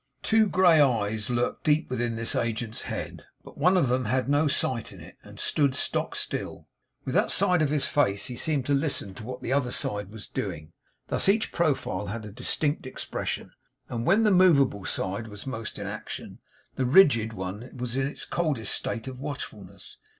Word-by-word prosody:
Two 220 Hz, -1 st, +4 dB
grey 175 Hz, -5 st, +6 dB
eyes 110 Hz, -5 st, +1 dB
lurked 120 Hz, 0 st, -1 dB
deep 150 Hz, 0 st, +2 dB
within 120 Hz, -2 st, -1 dB
this 115 Hz, 0 st, -1 dB
agent's 115 Hz, -1 st, -2 dB
head, -, -, -5 dB, 0.2 s
but -, -, -13 dB
one 180 Hz, +6 st, +4 dB
of 165 Hz, -, +3 dB
them 125 Hz, +1 st, +1 dB
had 130 Hz, +4 st, 0 dB
no 145 Hz, +2 st, +3 dB
sight 130 Hz, -5 st, 0 dB
in -, -, -12 dB
it, -, -, -12 dB
and -, -, -13 dB
stood 140 Hz, -3 st, +2 dB
stock -, -, -1 dB
still. -, -, -4 dB, 0.4 s
With -, -, -3 dB
that -, -, +3 dB
side 180 Hz, -2 st, +3 dB
of 150 Hz, -, +2 dB
his 150 Hz, -1 st, +1 dB
face 100 Hz, -9 st, +1 dB
he 125 Hz, -, -5 dB
seemed 140 Hz, +1 st, -1 dB
to 145 Hz, -, +1 dB
listen 140 Hz, -9 st, 0 dB
to 100 Hz, -, -10 dB
what 125 Hz, +3 st, -7 dB
the 130 Hz, -, -1 dB
other 140 Hz, -3 st, +1 dB
side 105 Hz, -4 st, -2 dB
was 110 Hz, 0 st, -9 dB
doing. 85 Hz, -4 st, -5 dB, 0.4 s
Thus -, -, +1 dB
each 215 Hz, +2 st, +2 dB
profile 145 Hz, -, 0 dB
had 110 Hz, +2 st, -5 dB
a 105 Hz, -, -8 dB
distinct 145 Hz, +6 st, -1 dB
expression; -, -, -4 dB, 0.4 s
and 115 Hz, -1 st, -3 dB
when 195 Hz, -, +4 dB
the 210 Hz, -, +4 dB
movable 145 Hz, -, +4 dB
side 100 Hz, +5 st, -2 dB
was 105 Hz, -2 st, -9 dB
most 115 Hz, -5 st, -5 dB
in -, -, -5 dB
action, -, -, -7 dB, 0.4 s
the 130 Hz, -, +1 dB
rigid 125 Hz, -, +5 dB
one 100 Hz, +5 st, -6 dB
was 125 Hz, 0 st, -4 dB
in 135 Hz, 0 st, +1 dB
its 140 Hz, -, -6 dB
coldest 150 Hz, -10 st, -1 dB
state 115 Hz, +1 st, -2 dB
of 130 Hz, -1 st, -7 dB
watchfulness. 140 Hz, 0 st, -7 dB
130 Hz, 195 wpm, -27 LUFS, 110-150 Hz, 0.4 s, grey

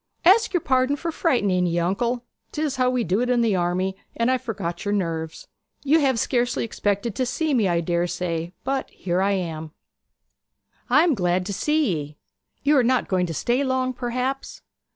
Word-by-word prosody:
'Ask 430 Hz, +6 st, +6 dB
your 350 Hz, -, +2 dB
pardon 260 Hz, +1 st, +2 dB
for 335 Hz, +3 st, -4 dB
frightening 205 Hz, -, +1 dB
ye, 170 Hz, 0 st, -1 dB
uncle. 235 Hz, +8 st, 0 dB, 0.3 s
'Tis 300 Hz, -3 st, -2 dB
how 255 Hz, -1 st, +3 dB
we 250 Hz, -1 st, 0 dB
do 185 Hz, +3 st, 0 dB
in 250 Hz, -1 st, +2 dB
the 225 Hz, -4 st, +2 dB
army, 185 Hz, +2 st, 0 dB, 0.2 s
and 235 Hz, +2 st, +1 dB
I 260 Hz, -, +1 dB
forgot 185 Hz, -9 st, -4 dB
your 205 Hz, 0 st, 0 dB
nerves. 165 Hz, -4 st, -3 dB, 0.4 s
You 295 Hz, +3 st, +4 dB
have 270 Hz, -5 st, +2 dB
scarcely 240 Hz, 0 st, 0 dB
expected 205 Hz, 0 st, -1 dB
to 255 Hz, -, -1 dB
see 300 Hz, +5 st, -1 dB
me, 225 Hz, -6 st, +3 dB
I 170 Hz, -1 st, +1 dB
dare 170 Hz, +1 st, 0 dB
say, 170 Hz, -1 st, -3 dB
but 270 Hz, 0 st, -2 dB
here 180 Hz, 0 st, -2 dB
I 200 Hz, +1 st, +2 dB
am.' 160 Hz, -4 st, -4 dB, 1.2 s
'I 290 Hz, +6 st, +6 dB
am 340 Hz, -3 st, +3 dB
glad 180 Hz, -4 st, 0 dB
to 200 Hz, -, -3 dB
see 300 Hz, -, +1 dB
ye. 150 Hz, -1 st, -6 dB, 0.5 s
You 290 Hz, +1 st, +4 dB
are 255 Hz, -, +5 dB
not 255 Hz, +1 st, +1 dB
going 185 Hz, -2 st, +1 dB
to 165 Hz, -, -4 dB
stay 245 Hz, -, +1 dB
long, 260 Hz, -1 st, 0 dB
perhaps?' 255 Hz, +2 st, -3 dB
235 Hz, 190 wpm, -23 LUFS, 180-260 Hz, 1.2 s, Ask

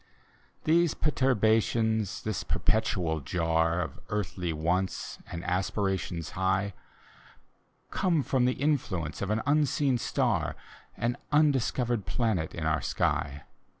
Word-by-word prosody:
These 165 Hz, 0 st, +3 dB
perturbations, 110 Hz, -, +2 dB
this 110 Hz, -4 st, -2 dB
perpetual 90 Hz, -7 st, 0 dB
jar 80 Hz, +3 st, +1 dB
Of 80 Hz, -, -5 dB
earthly 90 Hz, -4 st, -2 dB
wants 85 Hz, +4 st, -1 dB
and 85 Hz, 0 st, -5 dB
aspirations 95 Hz, -2 st, -1 dB
high. 95 Hz, +1 st, 0 dB, 1.2 s
Come 170 Hz, -6 st, +2 dB
from 130 Hz, -2 st, +2 dB
the 125 Hz, -, +3 dB
influence 110 Hz, -, -1 dB
of 100 Hz, -, -2 dB
an 110 Hz, +1 st, 0 dB
unseen 145 Hz, -2 st, +2 dB
stafi -, -, 0 dB, 0.4 s
An 120 Hz, +1 st, 0 dB
undiscovered 130 Hz, -7 st, +2 dB
planet 110 Hz, -9 st, 0 dB
in 80 Hz, -, -3 dB
our 80 Hz, 0 st, +1 dB
sky. 70 Hz, +1 st, -1 dB
105 Hz, 110 wpm, -29 LUFS, 85-125 Hz, 1.2 s, These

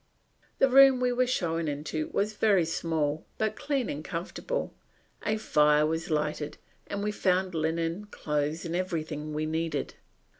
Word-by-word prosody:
The 270 Hz, -, +5 dB
room 270 Hz, 0 st, +7 dB
we 250 Hz, 0 st, +2 dB
were 250 Hz, +1 st, +2 dB
shown 165 Hz, -9 st, 0 dB
into 150 Hz, +1 st, -3 dB
was 210 Hz, +2 st, -1 dB
very 200 Hz, -5 st, +3 dB
small, 160 Hz, -2 st, -1 dB
but 215 Hz, 0 st, 0 dB
clean 280 Hz, -4 st, -1 dB
and 150 Hz, +2 st, -4 dB
comfortable; 180 Hz, -, -4 dB, 0.5 s
a 215 Hz, +1 st, 0 dB
fire 150 Hz, -7 st, +4 dB
was 160 Hz, +1 st, -2 dB
lighted, 150 Hz, -1 st, -1 dB, 0.3 s
and 200 Hz, 0 st, -3 dB
we 210 Hz, -, 0 dB
found 185 Hz, -2 st, +1 dB
linen, 165 Hz, +4 st, -1 dB
clothes, 150 Hz, -2 st, -2 dB
and 170 Hz, 0 st, -3 dB
everything 155 Hz, -4 st, -3 dB
we 155 Hz, +1 st, -1 dB
needed. 160 Hz, -2 st, -2 dB
165 Hz, 150 wpm, -28 LUFS, 155-210 Hz, 0.5 s, room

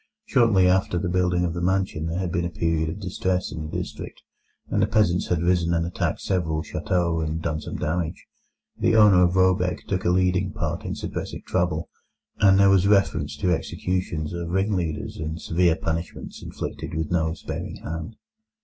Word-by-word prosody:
Shortly 115 Hz, -, +4 dB
after 90 Hz, -1 st, +2 dB
the 90 Hz, +1 st, -1 dB
building 90 Hz, -1 st, +2 dB
of 85 Hz, -, -2 dB
the 85 Hz, -, -4 dB
mansion 95 Hz, -3 st, 0 dB
there 80 Hz, +2 st, -2 dB
had 90 Hz, -2 st, -2 dB
been 85 Hz, -1 st, 0 dB
a 85 Hz, -, -1 dB
period 80 Hz, -1 st, 0 dB
of 85 Hz, -, -6 dB
distress 95 Hz, -1 st, -1 dB
in 80 Hz, +1 st, -5 dB
the -, -, -3 dB
district, -, -, -7 dB, 0.4 s
and -, -, 0 dB
the -, -, +3 dB
peasants 95 Hz, -5 st, +2 dB
had 85 Hz, -2 st, 0 dB
risen 85 Hz, -1 st, +2 dB
and 85 Hz, 0 st, +1 dB
attacked 85 Hz, -, -2 dB
several 80 Hz, -5 st, -1 dB
châteaux 85 Hz, -3 st, 0 dB
and 80 Hz, +1 st, -2 dB
done 80 Hz, -2 st, -2 dB
some -, -, -6 dB
damage. 80 Hz, +1 st, -2 dB, 0.5 s
The 115 Hz, 0 st, +2 dB
owner 105 Hz, -4 st, +7 dB
of 90 Hz, +1 st, +2 dB
Råbäck 90 Hz, -1 st, +2 dB
took 95 Hz, -2 st, -1 dB
a -, -, +2 dB
leading 90 Hz, +1 st, +2 dB
part -, -, -3 dB
in -, -, -3 dB
supressing -, -, -5 dB
the -, -, -17 dB
trouble, -, -, 0 dB, 0.5 s
and 95 Hz, -2 st, +6 dB
there 100 Hz, 0 st, +6 dB
was 95 Hz, 0 st, +4 dB
reference 80 Hz, -8 st, +2 dB
to 90 Hz, +4 st, +1 dB
executions 90 Hz, -2 st, -2 dB
of 85 Hz, -1 st, -4 dB
ring 95 Hz, +4 st, +1 dB
leaders 80 Hz, -4 st, -3 dB
and 80 Hz, +1 st, -4 dB
severe 85 Hz, 0 st, +2 dB
punishments 80 Hz, +1 st, -4 dB
inflicted -, -, -6 dB
with 80 Hz, 0 st, -2 dB
no 80 Hz, -2 st, +1 dB
sparing -, -, -6 dB
hand. 80 Hz, +7 st, -5 dB
90 Hz, 190 wpm, -24 LUFS, 80-95 Hz, 0.5 s, owner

